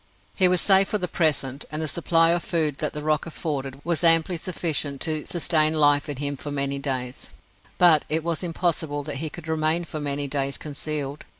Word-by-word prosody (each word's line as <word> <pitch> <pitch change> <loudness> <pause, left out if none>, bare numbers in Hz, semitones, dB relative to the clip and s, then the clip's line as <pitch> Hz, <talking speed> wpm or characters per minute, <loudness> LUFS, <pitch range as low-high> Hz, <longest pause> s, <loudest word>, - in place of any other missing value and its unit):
He 185 - +4
was 180 -1 +2
safe 195 -1 +5
for 210 - 0
the 180 -3 -3
present, 145 -5 0
and 155 - -3
the 160 - -2
supply 165 +1 +3
of 175 0 +1
food 155 -5 0
that 150 - -2
the 150 - -6
rock 155 +1 0
afforded 140 -5 -5
was 170 0 -1
amply 165 +1 +5
sufficient 160 -5 -2
to 155 -2 -2
sustain 160 -2 +2
life 145 -1 +3
in 145 - -4
him 145 0 -3
for 145 - -7
many 140 -1 -2
days, 130 -3 -4 0.5
but 170 -4 +5
it 160 +1 +2
was 170 -1 -2
impossible 165 -4 -2
that 145 -1 -5
he 155 +3 -3
could 170 +1 -11
remain 160 +2 0
for 155 -1 -6
many 145 -1 -2
days 140 0 -2
concealed. 145 -1 -5
155 Hz, 200 wpm, -24 LUFS, 145-165 Hz, 0.5 s, safe